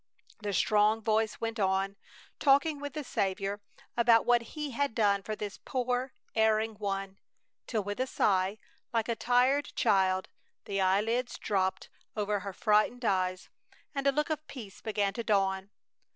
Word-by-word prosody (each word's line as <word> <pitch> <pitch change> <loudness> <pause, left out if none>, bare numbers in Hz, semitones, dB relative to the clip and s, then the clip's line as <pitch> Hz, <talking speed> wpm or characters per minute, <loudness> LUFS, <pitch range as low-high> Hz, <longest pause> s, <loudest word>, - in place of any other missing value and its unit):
The 210 -1 -3
strong 210 +2 +3
voice 220 0 +1
went 225 0 -3
on, 195 0 +1 0.4
talking 285 +2 +4
with 285 0 -5
the 305 -1 -4
Saviour 195 -2 -2 0.3
about 235 -1 +5
what 240 -1 +4 0.2
He 300 -2 -3
had 280 -1 -1
done 200 -3 +3
for 215 +2 -4
this 210 -2 -6
poor 250 0 -1 0.2
erring 220 0 +2
one, 195 -1 -3 0.5
till 220 -4 -1
with 205 +3 -4
a 255 - +1
sigh, 195 -3 +1 0.3
like 230 -2 0
a 235 - 0
tired 255 +5 +3
child, 190 -1 +2 0.4
the 195 -1 -1
eyelids 220 +6 +1
dropped 190 -2 -1 0.3
over 205 -1 0
her 200 +1 -5
frightened 215 +5 +2
eyes 185 -2 0 0.4
and 275 -1 -1
a - - +6
look 300 +3 -1
of 310 0 -3
peace 215 -8 -9
began 205 -2 0
to 235 - -4
dawn. 195 -3 +1
215 Hz, 155 wpm, -30 LUFS, 195-245 Hz, 0.5 s, a